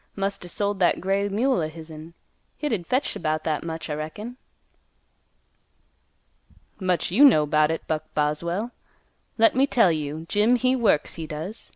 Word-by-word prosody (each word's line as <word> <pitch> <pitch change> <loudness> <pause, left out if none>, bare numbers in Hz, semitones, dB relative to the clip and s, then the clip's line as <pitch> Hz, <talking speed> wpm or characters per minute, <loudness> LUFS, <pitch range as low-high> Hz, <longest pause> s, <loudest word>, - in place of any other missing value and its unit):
Must 195 -1 -2
er - - -8
sold 200 +2 -1
that 175 - +3
gray 195 +2 0
mule 230 +1 +1
o' 155 - -2
hisn; 160 +1 -11 0.4
hit'd 225 - -2
fetch 260 +3 0
'bout 155 0 -1
that 155 -2 -1
much, 165 -1 -5
I 150 - -3
reckon." 180 +11 -6 2.4
"Much 185 -3 0
you 235 +10 +5
know 185 - +7
'bout 150 +1 +3
it, 160 - -3
Buck 155 -1 -3
Boswell. 170 +9 -1 0.7
Let 225 0 +4
me 270 +2 +3
tell 230 -10 +4
you, 155 0 -4
Jim 210 +6 +3
he 255 +2 +2
works, 215 - +2
he 160 - -5
does. 160 +8 -6
175 Hz, 160 wpm, -24 LUFS, 155-220 Hz, 2.4 s, know